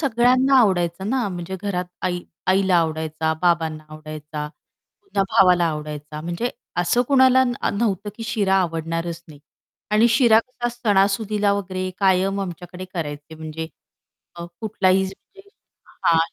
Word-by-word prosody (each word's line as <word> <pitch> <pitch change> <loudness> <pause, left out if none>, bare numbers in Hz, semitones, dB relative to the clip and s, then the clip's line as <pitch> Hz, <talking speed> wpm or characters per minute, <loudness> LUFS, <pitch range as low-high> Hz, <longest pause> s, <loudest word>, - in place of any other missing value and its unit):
सगळ्यांना 255 0 +3
आवडायचा 180 -4 +1
ना. 240 +1 0
म्हणजे 180 0 -5
घरात 185 -3 -1 0.2
आई 175 -1 -3 0.2
आईला 190 -1 +3
आवडायचा, 160 -1 0
बाबांना 160 -3 +1
आवडायचा, 155 -1 -7 0.6
पुन्हा 395 - -1
भावाला 180 -2 +5
आवडायचा. 150 0 -6
म्हणजे 175 +9 -3 0.3
असं 175 +8 +2
कुणाला 260 -2 +6
न 245 - 0 0.2
नव्हतं 205 -2 -1
की 230 - -7
शिरा 205 -3 +1
आवडणारच 165 0 -3
नाही 145 -2 -14 0.5
आणि 220 +3 +5
शिरा 230 -2 +5
कसा 240 0 -4
सणासुदीला 205 -2 +1
वगैरे 185 -2 -3
कायम 195 0 +2
आमच्याकडे 180 0 -6
करायचे 150 -2 -5
म्हणजे 160 0 -6 0.7
अ, 170 0 -7 0.2
कुठलाही 190 -3 +2
म्हणजे 195 - -11 0.6
हां, 165 - +5
185 Hz, 130 wpm, -22 LUFS, 165-215 Hz, 0.7 s, कुणाला